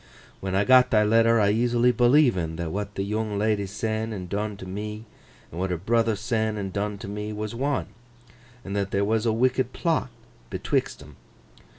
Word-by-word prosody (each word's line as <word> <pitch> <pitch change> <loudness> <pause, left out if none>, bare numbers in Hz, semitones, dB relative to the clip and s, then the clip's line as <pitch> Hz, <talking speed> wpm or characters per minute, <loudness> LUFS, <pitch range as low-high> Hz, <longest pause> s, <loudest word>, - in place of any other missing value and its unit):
When 95 -1 -3
I 100 - +3
got 130 +2 +6
thy 105 -1 +4
letter, 115 +2 +4
I 100 -1 +3
easily 120 +2 +3
believen 120 - +3
that 80 -1 -4
what 105 +2 -4
the 95 - -1
yoong 105 +1 -2
ledy 105 -1 0
sen 110 +2 -3
and 95 -4 -5
done 105 +2 -3
to 95 - -9
me, 105 +3 -6 0.5
and 85 - -7
what 95 +1 -1
her 90 - -1
brother 115 +4 +1
sen 110 0 -1
and 95 -2 -4
done 105 0 -2
to 100 - -8
me, 105 +1 -5
was 105 +1 -4
one, 135 +3 -1 0.8
and 100 0 -4
that 100 -1 -1
there 100 +1 0
were 110 +1 +1
a 115 - +2
wicked 130 +2 +1
plot 165 -6 0 0.4
betwixt - - -2
'em. 75 -1 -15
105 Hz, 195 wpm, -25 LUFS, 100-115 Hz, 0.8 s, got